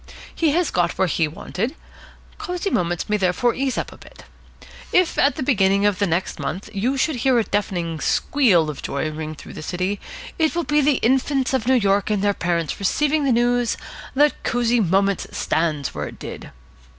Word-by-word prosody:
He 325 - +1
has 350 0 +1
got 175 -1 0
where 190 - +2
he 165 -1 +1
wanted. 200 - -4 0.6
Cosy 370 -1 -3
Moments 175 -1 -1
may 210 - +1
therefore 195 +5 +1
ease 265 -1 -1
up - - -3
a - - -14
bit. - - -15 0.7
If, 365 -2 +3
at 280 - +4
about - - -22
the - - -3
beginning 200 -6 +3
of 205 -1 +1
next 185 -2 0
month, 195 +4 -4
you 240 +7 0
should 285 0 0
hear 255 +1 +2
a 230 - +3
deafening 175 -6 -2
squeal 185 - +3
of 145 - -10
joy 155 +2 -2
ring 155 0 -5
through - - -11
this 155 - -8
city, 185 +3 -2 0.4
it 320 0 +2
will 345 - 0
be 295 -1 +2
the 285 -1 +3
infants 265 +2 +1
of 250 -3 0
New 260 - +5
York 200 -3 +2
and 205 -2 0
their 205 0 +3
parents 170 -4 -2
receiving 295 +9 +1
the 270 - +3
news 240 0 +2 0.4
that 295 +2 +3
Cosy 240 0 +1
Moments 195 0 +1
stands 155 -3 -1
where - - -4
it - - -10
did. - - -8
210 Hz, 195 wpm, -22 LUFS, 180-270 Hz, 0.7 s, New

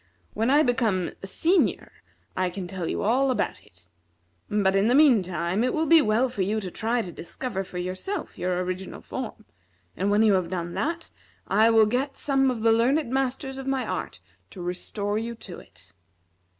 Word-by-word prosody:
When 225 +3 0
I 290 +3 +5
become 225 - +1
a 195 - -6
senior 340 - +1 0.4
I 185 -1 0
can 180 0 -6
tell 180 -2 -4
you - - -2
all 255 +6 +2
about 255 - -1
it. - - -18 0.6
But, 200 -2 +2
in 195 +2 +3
the 245 - +4
meantime, 190 - +3
it 255 - 0
will 320 0 +1
be 325 +1 +7
well 225 +3 +2
for 245 -5 -4
you 210 +4 0
to 190 -4 -6
try 230 +4 -1
to 180 - -7
discover 195 +4 -4
for 185 -1 -9
yourself 185 - -4
your 180 0 -1
original 185 +1 -5
form, - - -6 0.5
and 195 +3 0
when 205 +2 +4
you 215 -2 +5
have 185 -3 +1
done 175 -1 -4
that, 330 +2 -3 0.4
I 215 +3 +4
will 225 -1 +6
get 255 +6 -1
some 270 -2 +2
of 235 -4 -3
the 225 - +5
learned 245 +4 +2
masters 265 0 -2
of 270 - -7
my 270 -1 0
art - - -4 0.3
to 190 - -12
restore 205 +4 -3
you 235 +1 -4
to 195 -5 -9
it. 95 -2 -16
220 Hz, 190 wpm, -26 LUFS, 185-260 Hz, 0.6 s, be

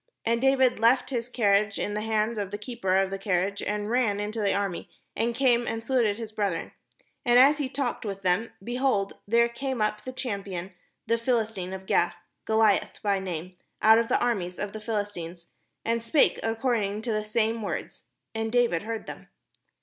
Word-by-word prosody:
And 230 +1 +1
David 265 -2 +3
left 240 +4 +3
his 240 -1 -2
carriage 205 -3 +2
in 205 - -2
the 210 - -2
hand 220 0 0
of 200 -2 -3
the 205 - -4
keeper 210 -4 -1
of 195 0 +1
the 195 - -4
carriage, 195 0 0
and 210 0 -2
ran 230 -5 +2
into 210 +2 -3
the 200 - +2
army, 200 -3 -2 0.3
and 235 +1 0
came 240 -2 +3
and 225 0 -3
saluted 230 -4 +1
his 225 -2 -6
brethren. 200 -6 -2 0.5
And 245 -3 +4
as 280 +4 +6
he 275 -3 -1
talked 270 -2 -2
with 195 -2 -5
them, 185 +5 +1
behold, 240 -4 0
there 235 +2 +4
came 260 +1 -4
up 210 0 0
the 255 - -5
champion, 200 -8 -4 0.3
the 230 0 +1
Philistine 225 -6 -1
of 190 0 -7
Gath, 175 -2 +2 0.3
Goliath 220 -2 +2
by 200 -2 +2
name, 180 -1 -6 0.2
out 220 +1 +7
of 230 - 0
the - - +2
arm 240 -5 +1
ies 180 +1 -6
of 205 -1 -4
the 215 - -7
Philistines, 200 -6 -4 0.4
and 230 0 +1
spake 230 +6 +3
according 225 -3 -1
to 235 - -1
the 215 -1 0
same 225 +1 0
words: 205 - -5 0.3
and 225 0 -2
David 240 -8 +2
heard 225 +1 -5
them. - - -9
220 Hz, 190 wpm, -27 LUFS, 200-235 Hz, 0.5 s, out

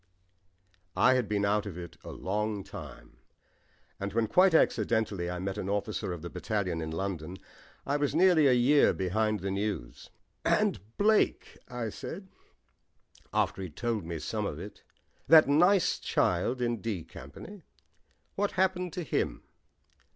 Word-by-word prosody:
I - - +5
had 125 -5 0
been 100 -1 +1
out 105 +1 +1
of 90 -4 -7
it 85 -2 -8
for - - -14
a - - -6
long 105 +1 -2
time, - - -11 0.8
and 100 0 -4
when 115 0 +2
quite 180 - +4
accidentally 110 - +1
I 90 - -3
met 95 +3 -4
an 95 - -4
officer 105 0 -2
of 85 -2 -6
the 85 - -5
battalion 95 -6 -2
in 80 - -4
London 90 0 -4 0.5
I 140 +1 0
was 145 0 -1
nearly 170 -4 +5
a 130 - +5
year 130 +4 +4
behind 105 +2 0
the 95 0 -2
news. 100 - -4 0.3
"And - - +2 0.2
Blake," 215 +1 +2
I 120 -3 -4
said, 190 - -8 1.0
after - - 0
he'd 90 -6 -7
told 115 -4 -2
me 85 0 -5
some - - -3
of - - -5
it, - - -9 0.5
"that 160 -1 +8
nice 175 +6 +4
child 120 +8 0
in 120 -3 -1
'D' 100 -7 -3
Company; 75 - -11 0.7
what 205 +1 -1
happened 180 -2 0
to 180 - -3
him?" 145 - -2
110 Hz, 155 wpm, -29 LUFS, 95-145 Hz, 1.0 s, that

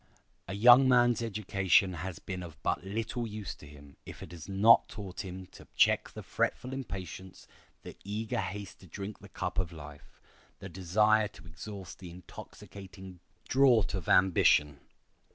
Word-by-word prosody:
A 95 - -5
young 120 +5 +7
man's 120 -2 +4
education 95 -4 +1
has 90 +1 -6
been 90 -2 -6
of 80 -4 -10
but - - -1
little 115 +4 -3
use 105 -2 -6
to 75 - -15
him 70 -1 -15
if - - -10
it 90 - -11
has 85 +1 -10
not 105 +4 +5
taught 100 -3 -7
him 95 0 -8
to - - -15
check - - +3
the - - -10
fretful 130 +1 -2
impatience, 95 - -8 0.4
the - - -10
eager 105 +2 -3
haste 100 -1 -7
to 95 - -15
drink 100 +5 -7
the - - -14
cup - - -4
of 90 -3 -1
life, 75 -3 -13 0.4
the - - -9
desire 105 +4 +2
to 100 - -16
exhaust 90 +3 -9
the 90 - -9
intoxicating 95 +1 -12 0.3
draught 125 -8 +4
of 95 -5 -4
ambition. 75 -6 +4
95 Hz, 160 wpm, -30 LUFS, 90-110 Hz, 0.4 s, young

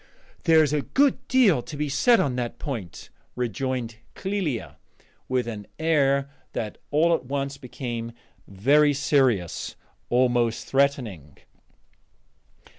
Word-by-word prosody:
"There 160 -2 +6
is 150 -1 0
a 150 - +1
good 275 - +1
deal 225 - +4
to 145 - -9
be 150 0 -1
said 230 - +4
on 130 -3 0
that 120 -2 -3
point," 110 - -6 0.2
rejoined 125 0 -3 0.2
Clélia, 190 - -3 0.5
with 125 -2 0
an 105 -3 -6
air 140 -4 +2 0.3
that 105 -2 -4
all 165 +3 +3
at 160 - -1
once 140 +1 -3
became 120 -3 -5 0.4
very 145 +10 +3
serious, 130 - +1 0.3
almost 120 -2 +2
threatening. 120 - 0
135 Hz, 115 wpm, -25 LUFS, 120-150 Hz, 0.5 s, There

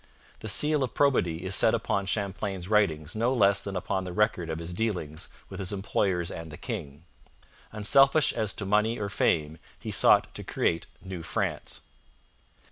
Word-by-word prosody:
The - - -7
seal 150 +7 +4
of 130 -3 -2
probity 90 - +1
is 95 - 0
set - - +5
upon 100 -1 -1
Champlain's 100 -2 -3
writings 90 -7 +1
no 120 +4 +1
less 100 -3 +4
than 100 -1 -6
upon 95 +1 -2
the 90 - -6
record 100 -3 0
of 80 - -3
his 85 +1 -5
dealings 90 -7 -3 0.2
with 95 - -9
his 95 -1 -2
employers 95 -3 -1
and 80 0 -7
the 75 - -9
king. 80 - -6 0.7
Unselfish 135 +7 +4
as 110 -4 -1
to 100 - -4
money 105 +4 +2
or 100 -1 -3
fame, 80 -5 0 0.2
he - - -6
sought - - +4
to - - -7
create 85 - -1 0.2
New 95 -3 -6
France. 80 - -3
95 Hz, 170 wpm, -27 LUFS, 85-105 Hz, 0.7 s, set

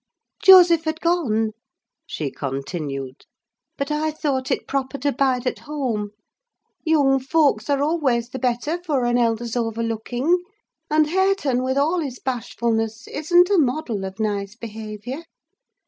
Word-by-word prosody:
"Joseph 350 -4 +8
had 315 0 -2
gone," 250 -12 +1 0.6
she 145 -4 -4
continued, 135 -1 -5 0.5
"but 280 +1 -3
I 305 +1 0
thought 280 -4 -2 0.2
proper 275 0 -2
to 285 +1 0
bide 260 -2 +1
at 250 - -2
home. 250 -9 -3 0.7
Young 285 -5 +3
folks 270 -4 +1
are 280 0 +2
always 270 -7 +1
the 260 - -6
better 255 +8 -1
for 290 -8 0
an 240 0 +2
elder's 230 0 0
over 230 -1 -1
looking; 245 +9 0 0.5
and 305 0 +4
Hareton, 370 -7 +1
with 260 +1 -1
all 315 +6 +2
his 275 -6 -4
bashfulness, 230 -3 -2
isn't 350 +5 +3
a 395 - +5
model 250 -7 0
of 190 +1 -7
nice 205 -1 -2
behaviour. 220 +4 -7
260 Hz, 135 wpm, -22 LUFS, 225-305 Hz, 0.7 s, Joseph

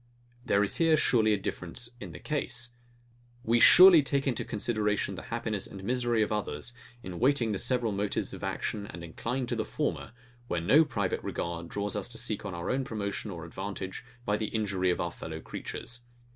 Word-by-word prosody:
There 100 -3 +3
is 100 - -2
here 165 -2 +4
surely 110 -6 +3
a 105 - +3
difference 95 +5 -4
in 100 -6 -7
the 75 - -9
case. 125 - -2 0.7
We 115 +1 +3
surely 180 +4 +10
take 140 0 0
into 130 -5 0
consideration 105 -2 -1
the - - -6
happiness 110 -4 -2
and 95 -1 -9
misery 120 0 +2
of 105 - -3
others, 105 +3 -3 0.3
in 90 -2 -6
weighing 125 -3 +3
the 100 - -1
several 125 -4 +1
motives 100 0 -1
of - - -8
action, 105 -1 -3
and 85 - -8
incline 120 +10 -3
to - - -2
the - - 0
former, - - -3 0.3
where 85 - 0
no 140 - +6
private 100 -10 -2
regards 85 0 -4
draw 100 0 -2
us 105 0 -1
to 120 -1 -6
seek 110 - -2
our 85 -3 -3
own 135 +1 0
promotion 105 -3 -4
or 85 -3 -6
advantage 95 +3 -5 0.2
by 105 0 +1
the 110 - -2
injury 100 -4 0
of 90 - +1
our 85 -1 -1
fellow 80 -2 -7
creatures. 120 +8 -6
105 Hz, 190 wpm, -29 LUFS, 95-120 Hz, 0.7 s, surely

